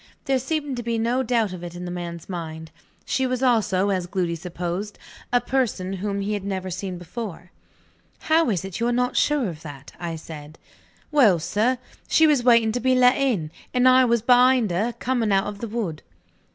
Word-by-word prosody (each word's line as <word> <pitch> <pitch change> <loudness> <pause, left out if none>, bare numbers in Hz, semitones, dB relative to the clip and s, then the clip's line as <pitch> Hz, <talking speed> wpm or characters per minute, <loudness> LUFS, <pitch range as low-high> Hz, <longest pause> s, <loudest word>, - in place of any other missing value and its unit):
There 270 -2 +2
seemed 285 0 -2
to - - -2
be 230 0 -2
no 235 +3 +1
doubt 230 -5 0
of 180 -1 -8
it 175 0 -7
in 180 0 -6
the 175 - -5
man's 170 -2 -6
mind. 160 -3 -6 0.3
She 265 -1 0
was 255 0 -2
also, 205 -6 +2
as 185 -2 -1
Gloody 180 -2 -1
supposed, 180 +4 -5 0.3
a 245 - +4
person 240 -7 -1
whom 200 +1 -3
he 205 +2 -2
had 205 -2 -3
never 190 -2 -3
seen 185 0 -4
before. 180 0 -7 0.7
"How 320 -3 +3
is 190 -3 -1
it 195 0 -6
you 235 - +1
are - - +1
not 250 +1 0
sure 295 -6 +2
of 160 -4 -7
that?" 145 -3 -10
I 170 -1 -4
said. 155 -1 -10 0.5
"Well, 240 - +5
sir, 215 +10 0 0.3
she 320 - +5
was 295 -5 +3
waiting 235 -2 +5
to 245 - -2
be 255 +1 +2
let 250 0 +5
in; 220 - 0 0.2
and 250 +1 +4
I 255 0 +7
was 235 -2 +1
behind 250 -3 +4
her, 210 +8 0
coming 240 -4 0
out 195 0 +3
of 205 -1 -6
the 230 - -4
wood." 205 -8 -4
210 Hz, 205 wpm, -23 LUFS, 180-250 Hz, 0.7 s, I